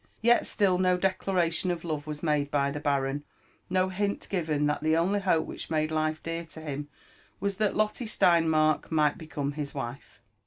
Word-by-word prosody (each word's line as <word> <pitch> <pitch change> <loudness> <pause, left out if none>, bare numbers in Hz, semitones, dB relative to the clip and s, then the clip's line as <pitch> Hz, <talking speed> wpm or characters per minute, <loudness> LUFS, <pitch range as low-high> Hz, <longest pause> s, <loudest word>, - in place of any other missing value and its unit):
Yet 240 +1 +4
still 190 -4 +2
no 185 -1 +3
declaration 185 -2 +1
of 175 -1 -2
love 155 -3 -3
was 150 0 -6
made 150 -3 +1
by 140 -1 +1
the 150 - -4
baron, 140 0 0 0.5
no 185 +1 +2
hint 200 +2 -2
given 155 -6 0
that 150 0 0
the 155 +1 +2
only 190 +5 +2
hope 180 -5 +2
which - - -7
made 155 -1 0
life 155 0 -1
dear 165 0 -3
to 160 -1 -11
him 145 -1 -5 0.5
was 200 -1 -1
that 210 -2 +1
Lotte 215 +3 0
Steinmark 160 -5 +3
might 150 -2 +2
become 145 -3 -3
his 145 -1 -5
wife. 135 -1 -6
160 Hz, 185 wpm, -28 LUFS, 150-185 Hz, 0.5 s, Yet